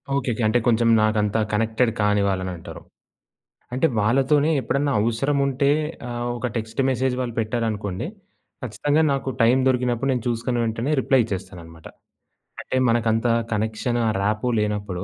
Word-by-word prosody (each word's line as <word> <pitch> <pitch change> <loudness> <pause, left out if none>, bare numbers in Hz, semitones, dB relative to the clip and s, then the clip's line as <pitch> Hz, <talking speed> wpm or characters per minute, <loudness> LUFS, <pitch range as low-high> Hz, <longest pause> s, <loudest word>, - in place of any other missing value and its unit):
ఓకేకే. 125 -4 -1
అంటే, 120 +3 +2
కొంచెం 115 0 +3 0.2
నాకంతా 110 0 +1
కనెక్టెడ్ 110 +2 +1
కాని 105 0 +2
వాళ్ళనంటారు. 95 -3 -5 0.9
అంటే 130 - +2
వాళ్ళతోనే 135 +7 +2
ఎప్పుడన్న 140 +4 0
అవసరముంటే, 140 +4 +1 0.4
ఆహ్, 120 0 -4
ఒక 125 - -2
టెక్స్ట్ 110 +3 -3
మెసేజ్ 130 0 0
వాళ్ళు 120 -2 -3
పెట్టారనుకోండి, 110 - -2 0.6
ఖచ్చితంగా 145 +6 0
నాకు 135 -1 -2
టైం 120 +3 +5
దొరికినప్పుడు 125 0 0
నేను 125 - -1
చూసుకున్న 120 +1 -1
వెంటనే, 115 +5 -2
రిప్లై 130 0 +3
ఇచ్చేస్తాననమాట. 85 -5 -8 0.8
అంటే - - -5
మనకంత 115 0 +1 0.3
కనెక్షను, 110 +3 -1
ఆ - - +1
రాపో 105 +4 0
లేనప్పుడు 105 -3 -2
115 Hz, 130 wpm, -23 LUFS, 105-130 Hz, 0.9 s, టైం